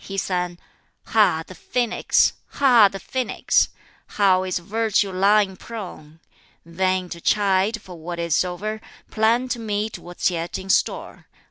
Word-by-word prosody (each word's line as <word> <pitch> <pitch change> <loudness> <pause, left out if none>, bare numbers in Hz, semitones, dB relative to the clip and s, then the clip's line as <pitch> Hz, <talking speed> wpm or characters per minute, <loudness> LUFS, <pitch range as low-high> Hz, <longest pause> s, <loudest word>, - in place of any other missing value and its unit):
He 195 - -7
sang 180 -2 -2 0.5
"Ha, 210 -8 +3
the - - -11
phoenix! 240 +6 +1 0.2
Ha, 245 -7 +6
the 195 - -7
phoenix! 255 +6 0 0.4
How 190 -3 +3
is 185 -1 -2
Virtue 210 +2 0
lying 195 +1 +3
prone! 180 -8 -9 0.5
Vain 185 +2 -1
to 170 -1 -8
chide 200 +2 +2
for 180 -4 -12
what 170 +2 -6
is 170 -1 +1
o'er, 210 +5 -4 0.3
Plan 230 +3 +2
to 245 - -2
meet 215 -1 -3
what's 175 +1 -2
yet 170 0 -3
in 190 0 -3
store. - - -1
195 Hz, 140 wpm, -22 LUFS, 180-215 Hz, 0.5 s, Ha